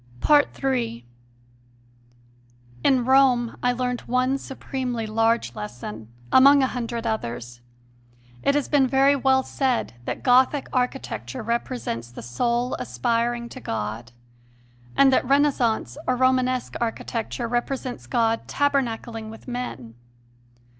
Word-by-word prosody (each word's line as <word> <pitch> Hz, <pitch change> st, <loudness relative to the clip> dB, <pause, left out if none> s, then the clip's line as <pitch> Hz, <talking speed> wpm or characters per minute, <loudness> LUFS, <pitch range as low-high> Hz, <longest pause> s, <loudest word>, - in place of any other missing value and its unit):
3. 240 Hz, -, -2 dB, 1.8 s
In 255 Hz, -3 st, +3 dB
Rome 255 Hz, -3 st, +4 dB
I 245 Hz, -, +2 dB
learned 250 Hz, 0 st, -2 dB
one 255 Hz, +2 st, +1 dB
supremely 255 Hz, -4 st, -4 dB
large 225 Hz, -, +1 dB
lesson, 110 Hz, 0 st, -8 dB, 0.2 s
among 275 Hz, +1 st, +7 dB
a 260 Hz, -, 0 dB
hundred 235 Hz, -1 st, -4 dB
others. 120 Hz, -, -4 dB, 0.8 s
It 280 Hz, -, +2 dB
has 290 Hz, -, 0 dB
been 280 Hz, -3 st, +3 dB
very 270 Hz, +2 st, +4 dB
well 265 Hz, -1 st, +3 dB
said 260 Hz, -, -1 dB
that -, -, -4 dB
Gothic 260 Hz, +3 st, +4 dB
architecture 245 Hz, -, -2 dB
represents 235 Hz, -, -3 dB
the 120 Hz, -, -10 dB
soul 235 Hz, -, -1 dB
aspiring 235 Hz, -, -1 dB
to 255 Hz, -, -9 dB
God, 110 Hz, -, -4 dB, 0.9 s
and 275 Hz, -1 st, +6 dB
that -, -, +3 dB
Renaissance 255 Hz, -, +1 dB
or 255 Hz, -, +2 dB
Romanesque 255 Hz, 0 st, +1 dB
architecture 230 Hz, +1 st, -3 dB
represents 245 Hz, +1 st, -3 dB
God 230 Hz, -2 st, 0 dB
taberna 275 Hz, -5 st, +1 dB
cling 225 Hz, -2 st, -8 dB
with 225 Hz, +4 st, -12 dB
men. 245 Hz, -, -5 dB
245 Hz, 115 wpm, -24 LUFS, 225-260 Hz, 1.8 s, among